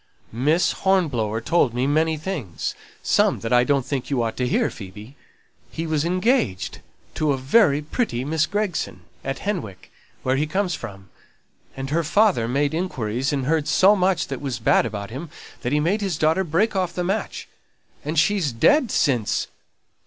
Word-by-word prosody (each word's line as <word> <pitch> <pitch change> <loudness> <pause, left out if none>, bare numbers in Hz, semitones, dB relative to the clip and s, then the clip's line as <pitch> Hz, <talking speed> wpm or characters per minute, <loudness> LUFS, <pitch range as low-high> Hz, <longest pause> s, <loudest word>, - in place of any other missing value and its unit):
"Miss 150 +9 +2
Hornblower 130 - 0
told 120 -2 +2
me 125 +1 +1
many 155 +3 +2
things; 150 - -4 0.3
some - - +2
that 115 +2 -2
I 120 0 +6
don't 140 -1 +1
think 135 -3 -3
you 130 -4 +1
ought 115 - -2
to 125 - 0
hear, - - +1
Phoebe. 105 +5 -10 0.5
He 165 - -4
was 155 -2 0
engaged 180 - 0 0.3
to 150 -2 +1
a - - -2
very 145 - +3
pretty 150 - -2
Miss 155 +1 +1
Gregson, 205 -4 -2 0.2
at 135 0 -3
Henwick, 170 - -4 0.3
where 130 +1 +1
he 150 +2 0
comes 190 +2 0
from; 100 - -8 0.7
and 135 0 -5
her 165 +2 +1
father 180 - +3
made 140 +4 0
inquiries, 135 - -2
and 135 -3 -1
heard 150 0 +1
so 200 +3 +5
much 185 -2 +1
that 135 -2 -4
was 135 -4 -3
bad 115 0 +3
about 105 -1 -6
him 145 +7 -6 0.3
that 125 - -2
he 150 - +2
made 185 +8 +1
his 190 -6 -1
daughter 160 +5 +2
break 190 +6 +1
off 180 -2 0
the 180 - -2
match, 195 +4 -3 0.6
and 155 +3 -3
she's 180 -3 +2
dead 250 - +3
since!" 125 - +1
150 Hz, 175 wpm, -23 LUFS, 125-180 Hz, 0.7 s, I